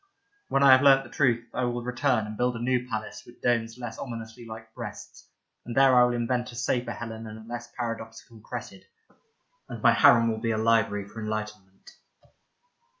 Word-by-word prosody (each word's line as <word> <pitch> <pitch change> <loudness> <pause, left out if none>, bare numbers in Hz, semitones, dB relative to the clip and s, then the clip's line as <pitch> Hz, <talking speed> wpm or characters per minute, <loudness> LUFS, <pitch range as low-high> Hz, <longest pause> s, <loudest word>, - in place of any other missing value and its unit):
When 135 - +2
I 135 - +8
have 130 0 +7
learnt 135 -1 +6
the - - -14
truth, 120 -4 +1
I 130 - -1
will 120 0 -2
return 125 -2 0
and 105 0 -7
build 125 +2 0
a - - -5
new 125 +1 0
palace 110 -2 -5
with 120 - -17
domes 115 -1 0
less 120 -2 -7
ominously 115 -1 -8
like 110 0 -10
breasts, - - -9 0.3
and 120 +1 -7
there 135 -1 +6
I 125 - +7
will 125 0 +2
invent 120 +1 -1
a - - -12
safer 120 0 -1
Helen 115 -1 -7
and 110 0 -8
a 110 0 -13
less 120 0 -7
paradoxical 115 -1 -6
Cressid, 105 -4 -8 0.8
and - - -6
my - - +7
harem 115 -1 +5
will 110 - -3
be 115 +1 -2
a 110 - 0
library 110 -3 +1
for 110 +2 -9
enlighten 105 -2 -4
ment. 95 0 -19
115 Hz, 200 wpm, -27 LUFS, 110-125 Hz, 0.8 s, I